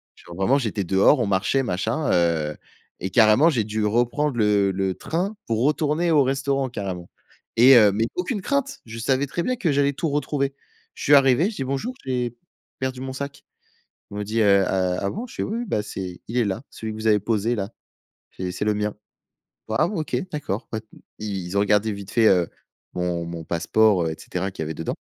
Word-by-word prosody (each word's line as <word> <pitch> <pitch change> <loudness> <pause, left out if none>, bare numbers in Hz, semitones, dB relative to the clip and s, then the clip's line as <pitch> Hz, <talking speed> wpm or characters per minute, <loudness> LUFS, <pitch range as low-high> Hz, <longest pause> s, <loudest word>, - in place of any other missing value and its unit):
Genre, 85 - -12
vraiment, 95 +9 +2
j'étais 110 -6 -2
dehors, 95 - +4
on - - +1
marchait, 100 +8 +1
machin, 115 - -1
heu 80 -3 +1 0.4
et 95 - -2
carrément, 110 - +5
j'ai 115 -8 0
dû 110 0 -2
reprendre 120 +5 +1
le 105 -2 +3
le 95 0 -1
train 185 +6 -2
pour 115 0 0
retourner 150 +3 +1
au 145 -3 +5
restaurant, 135 0 0
carrément 95 -6 -5 0.5
et 130 +3 +8
heu 105 -3 +7
mais 110 +3 0
aucune 190 +4 -2
crainte. 280 +5 -1
Je 115 0 -8
savais 135 +4 +1
très 170 +5 -2
bien 255 +5 -1
que 185 -8 0
j'allais 140 0 +3
tout 160 - -2
retrouver. 140 -1 -1 0.4
Je - - -9
suis 145 - +4
arrivé, 140 - +5
je 220 - -8
dis: - - -2
«Bonjour, 140 - -2
j'ai 125 -2 -2 0.4
perdu 130 -1 -3
mon 130 0 -4
sac». 140 +1 -6 0.7
Ils - - -7
m'ont 105 - -2
dit: 110 +3 -2
«Heu, 100 -2 +5
ah, 90 -1 0
ah 100 - 0
bon» 235 +4 -5
je - - -13
fais: - - -2
«Oui, 225 +3 -3
oui, 240 - -3
bah 105 - 0
c'est 90 -3 -6
il 115 - -6
est 120 - +3
là, 100 +5 -3
celui 110 -1 -6
que 110 - -8
vous 110 - -6
avez 105 -1 +5
posé 110 +2 0
là, 100 -2 -3 0.7
c'est 90 -1 -3
c'est 100 +3 -3
le 105 - +2
mien, 105 0 -2 0.8
"ah, 110 +9 +2
bon, 190 -4 -2
OK, 155 - -2
d'accord" 130 -8 -4
pas», 110 - -4 0.4
ils 95 -3 -4
ont 100 - +4
regardé 105 +1 +2
vite 100 -1 -9
fait, 115 -2 +4
heu, 90 -4 +3 0.4
mon 90 -1 -2
mon 85 -1 -6
passeport, 95 +3 +2
heu 80 - -1
et - - -5
cetera 95 +2 -4
qu'il 80 - -5
y - - -4
avait 80 - -4
dedans. 80 - -3
110 Hz, 220 wpm, -23 LUFS, 95-140 Hz, 0.8 s, et